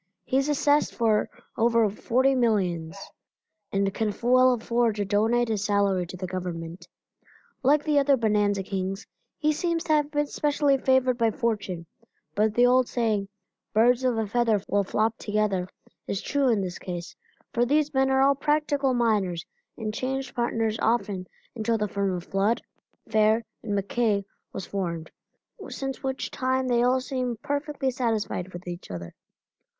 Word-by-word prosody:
He 260 - +1
is 275 +2 +1
assessed 290 0 +2
for 220 -3 +2 0.3
over 230 -1 +3
forty 255 +6 +1
millions, 190 -9 0 0.7
and 195 0 0
can 220 0 0
well 255 +1 +5
afford 235 -1 +1
to 205 -1 -1
donate 225 +4 +2
his 210 -3 -1
salary 200 -3 +1
to 185 - -8
the 185 - -4
Government. 175 -1 -5 0.7
Like 290 +2 +3
the 300 -2 +3
other 280 -1 +4
bonanza 210 -3 +1
kings 195 +1 -3 0.3
he 305 0 +2
seems 335 +1 -1
to 315 - +1
have 295 -1 +2
been 295 -1 0
specially 290 -1 +1
favored 260 -1 +2
by 230 -1 +4
fortune, 205 -7 -2 0.5
but 210 +3 +1
the 245 - +5
old 250 0 +4
saying, 215 -5 0 0.5
"Birds 245 +3 +4
of 250 -3 +1
a 220 - 0
feather 225 0 +2
will 200 0 +2
flock 220 +3 0
together," 205 -4 0 0.4
is 200 - -2
true 280 +2 +1
in 220 -4 +2
this 185 -2 -4
case, 175 -1 -6 0.4
for 240 - +2
these 295 +4 +1
men 265 0 +3
are 265 0 +4
all 280 +1 +5
practical 285 -2 +1
miners 205 -8 +1 0.3
and 215 -2 -4
changed 265 +2 -3
partners 225 -2 -1
often 205 -5 0 0.3
until 225 0 0
the 210 -1 -1
firm 200 -2 -1
of 175 - -5
Flood, 200 +6 +1 0.5
Fair 220 +1 +3
& - - -51
MacKay 205 0 0 0.3
was 185 - -6
formed, 170 -5 -4 0.6
since 270 -1 -5
which 265 -1 -3
time 260 0 0
they 240 -1 +3
all 255 +1 +3
seem 255 -3 -3
perfectly 285 -2 -1
satisfied 225 -7 -1
each 185 - -17
with 175 +1 -8
the 175 -1 -6
other. 85 -2 -7
225 Hz, 165 wpm, -26 LUFS, 200-260 Hz, 0.7 s, well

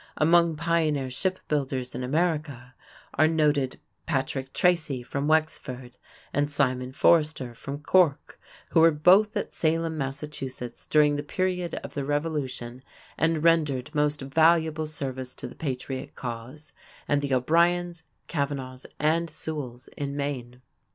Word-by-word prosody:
Among 170 +1 +4
pioneer 155 -4 0
ship 185 +8 -1
builders 135 -4 -2
in - - -4
America 145 -3 -1 0.4
are 155 - +4
noted 150 -4 +1 0.3
Patrick 135 -3 -2
Tracy 155 -8 +1
fron 140 +3 -3
Wexford 130 -6 -1 0.4
and 145 +1 +1
Simon 130 -3 0
Forrester 150 -4 +2
from 140 +4 -7
Cork, 170 -4 +2 0.3
who - - +4
were 165 +1 +8
both 185 +8 +4
at - - -3
Salem, 160 0 0
Mass., 135 0 -3 0.7
during 150 -1 +4
the - - -1
period 180 +2 -1
of - - -8
the 140 - -2
Revolution 140 -4 -3 0.3
and 160 -1 +1
rendered 150 -4 +2
most 150 -1 +1
valuable 160 +2 +3
service 130 -4 -5
to - - -8
the - - -10
patriot 130 -2 -5
cause; 125 +5 -7 0.3
and 145 -1 +2
the 140 -1 -3
O'Briens, 170 +5 +2 0.3
Kavanaghs, 135 -4 -3
and 165 +3 +1
Sewalls 145 -5 -6
in 140 -1 -4
Maine. 130 -3 -4
145 Hz, 130 wpm, -26 LUFS, 130-160 Hz, 0.7 s, were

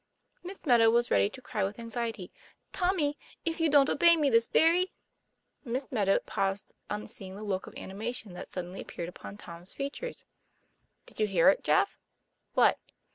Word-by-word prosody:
Miss 370 +1 -9
Meadow 235 -5 +6
was 240 +1 +2
ready 200 - +4
to 255 +4 -12
cry 215 -5 -2
with 200 +2 -2
anxiety. 230 -5 -4 0.2
' - - -46
Tommy, 355 -6 0 0.3
if 330 0 -1
you 325 -1 +3
don't 280 -1 +6
obey 340 +1 +5
me 290 -3 +2
this 230 0 +4
very 350 +3 +3 0.4
" - - -49
Miss 260 +1 -3
Meadow 200 -6 +3
paused 195 0 -2 0.2
on 210 0 -3
seeing 190 -1 -10
the 210 - -8
look 195 -2 -2
of - - -11
anima 210 +5 -4
tion 220 -6 -6
that 180 - -9
suddenly 180 +1 -5
appeared 170 - -6
upon 195 +2 -10
Tom's 170 -2 -11
features. 285 - -5 0.8
"Did - - -15
you 215 - +3
hear 185 -5 +5
it, - - +2
Jeff?" - - +2 0.3
" - - -50
What - - +4
230 Hz, 185 wpm, -30 LUFS, 195-290 Hz, 0.8 s, Meadow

